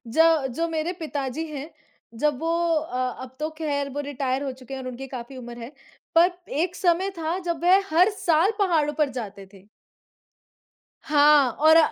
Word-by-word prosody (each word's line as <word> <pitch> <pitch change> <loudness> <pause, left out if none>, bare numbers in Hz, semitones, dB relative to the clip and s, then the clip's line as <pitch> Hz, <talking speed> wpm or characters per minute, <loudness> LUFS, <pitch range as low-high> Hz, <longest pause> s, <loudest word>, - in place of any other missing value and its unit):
जो 320 +3 +4
जो 335 +3 0
मेरे 325 +1 -2
पिताजी 295 0 -3
हैं, 300 +2 -7 0.4
जब 290 +2 0
वो 330 - -1 0.2
अ, 255 -5 -2
अब 260 0 -11
तो 310 - -1
खैर 285 -3 -2
वो 290 - -4
रिटायर 270 -1 -2
हो 275 -2 -3
चुके 255 0 -10
हैं 265 - -5
और 255 - -6
उनकी 255 +2 -7
काफ़ी 245 +2 -8
उम्र 240 -1 -9
है, 240 +4 -8 0.4
पर 340 +2 +6 0.3
एक 360 0 -2
समय 365 +2 +2
था 330 +3 -1
जब 340 -1 -2
वह 375 +3 +6
हर 360 +6 +5
साल 345 -2 +2
पहाड़ों 325 -7 +2
पर 290 - +2
जाते 200 -3 -9
थे। 195 -1 -17 1.4
हाँ, 295 -4 +5
और 315 +5 +5
295 Hz, 175 wpm, -24 LUFS, 260-330 Hz, 1.4 s, पर